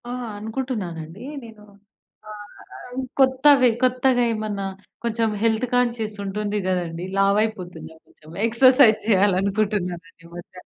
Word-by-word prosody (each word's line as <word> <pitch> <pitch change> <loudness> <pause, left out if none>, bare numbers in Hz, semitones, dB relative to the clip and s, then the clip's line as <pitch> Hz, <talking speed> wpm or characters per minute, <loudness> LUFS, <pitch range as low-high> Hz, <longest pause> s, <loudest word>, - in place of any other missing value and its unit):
ఆ! - - -4 0.3
అనుకుంటున్నానండి. 205 -6 -5 0.2
నేను 220 -2 -13 0.7
ఆహ్, 210 -1 -12
ఆహ్, 250 +1 -7 0.2
కొత్తవి, 265 0 +5
కొత్తగా 255 0 +2
ఏమన్నా 210 -2 -4 0.4
కొంచెం 230 -1 0
హెల్త్ 225 +1 +1
కాన్షియస్ 235 -4 -1
ఉంటుంది 210 +1 -3
కదండీ! 175 -2 -2
లావైపోతున్నాం 195 -6 -1
కొంచెం 155 - -20 0.2
ఎక్సర్సైజ్ 250 0 +5
చేయాలనుకుంటున్నాను 195 -2 +1 0.2
ఈ - - -16
మధ్య. 175 +1 -11
215 Hz, 105 wpm, -22 LUFS, 190-240 Hz, 0.7 s, కొత్తవి